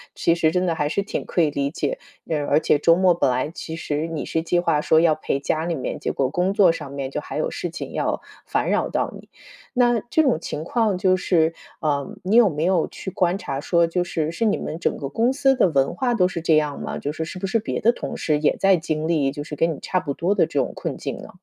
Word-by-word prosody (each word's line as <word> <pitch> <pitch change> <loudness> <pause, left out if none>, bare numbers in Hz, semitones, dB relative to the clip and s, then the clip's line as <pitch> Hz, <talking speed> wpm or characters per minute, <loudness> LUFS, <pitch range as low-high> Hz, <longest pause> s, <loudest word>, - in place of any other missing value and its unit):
其 170 - +2
实 160 -2 +2
真 180 +2 +1
的 170 - 0
还 150 -2 -1
是 200 - 0
挺 200 - -4
可 175 - 0
以 155 - +3
理 140 0 -2
解。 - - -2 0.3
呃， 150 -3 0
而 145 +2 +3
且 150 - +3
周 165 +3 +5
末 185 -1 +5
本 170 - +1
来 130 +4 -1
其 160 -1 -7
实 150 -1 -2
你 160 -3 -4
是 160 - -1
计 175 +1 +1
划 150 -4 +1
说 160 - +4
要 160 -2 +4
陪 145 -2 -2
家 155 +3 -1
里 170 0 -1
面， 130 - -4
结 - - -2
果 135 -2 0
工 180 +6 0
作 185 -5 +5
上 145 -4 -7
面 140 -1 -4
就 - - -4
还 - - -6
有 - - 0
事 - - -4
情 - - -7
要 - - -1 0.2
烦 - - -1
扰 - - +1
到 - - -1
你。 - - -16 0.4
那 240 -3 +3
这 315 - +3
种 260 - +2
情 155 -1 -5
况 220 -4 +1
就 185 0 +3
是 165 -3 +2 0.3
啊， 145 -3 0 0.2
你 195 +4 +1
有 235 -4 +7
没 155 +1 -2
有 180 -3 +2
去 190 - -7
观 180 +1 +1
察 135 -7 -4
说， 170 +2 +2
就 175 +2 0
是 160 -3 -2
是 170 +8 -3
你 215 - +2
们 155 - -5
整 170 - -1
个 140 - -4
公 230 - +1
司 270 -1 +3
的 190 - +3
文 140 -1 +1
化 245 +4 0
都 185 -6 +3
是 175 -2 -5
这 160 -1 +4
样 150 -2 -1
吗？ - - -4
就 145 - -4
是 160 - -3
是 175 +3 -7
不 195 - -2
是 225 +4 +1
别 220 - -3
的 235 +3 +3
同 - - -6
事 150 -2 0
也 150 - +2
在 195 -1 +4
经 155 -2 -2
历， 150 -5 +1
就 145 - -6
是 150 0 -6
跟 165 +3 +1
你 - - -9
差 185 - -1
不 140 - -3
多 180 +8 0
的 - - +4
这 - - -2
种 - - -1
困 - - -4
境 - - -5
呢？ - - -10
165 Hz, 295 characters per minute, -23 LUFS, 150-185 Hz, 0.4 s, 有